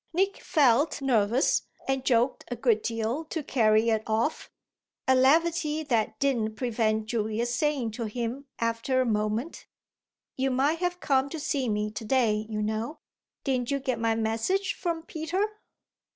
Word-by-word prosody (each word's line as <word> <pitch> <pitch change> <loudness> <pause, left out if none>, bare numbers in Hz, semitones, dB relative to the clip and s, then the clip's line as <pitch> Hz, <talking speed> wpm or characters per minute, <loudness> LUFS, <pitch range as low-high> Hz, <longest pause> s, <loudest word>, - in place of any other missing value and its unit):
Nick 385 +3 0
felt 285 -1 +3
nervous 245 -2 +2 0.3
and 270 -1 0
joked 245 0 +2
a 245 - -4
good 230 -2 +2
deal 230 +6 -2
to 315 0 -4
carry 220 -3 +3
it 220 -1 +1
off 225 +7 -1 0.6
a 260 - +6
levity 310 +3 +3
that 235 -7 0
didn't 235 -6 0
prevent 220 -2 0
Julia's 225 +1 -1
saying 270 -4 0
to 230 +2 -4
him 240 +5 -4
after 230 +3 0
a - - +1
moment: 215 +6 -2 0.7
"You 265 +1 0
might 280 +5 +1
have 355 0 -1
come 270 -1 +2
to 320 - -5
see 275 -4 -1
me 210 0 -1
to 215 - -6
day, 220 -3 +1
you 210 -1 -2
know. 220 +7 -2 0.5
Didn't 255 -3 0
you 280 - +1
get 260 -4 -2
my 225 0 +1
message 225 - 0
from 335 -3 -3
Peter?" 330 +5 -1
245 Hz, 155 wpm, -27 LUFS, 220-285 Hz, 0.7 s, a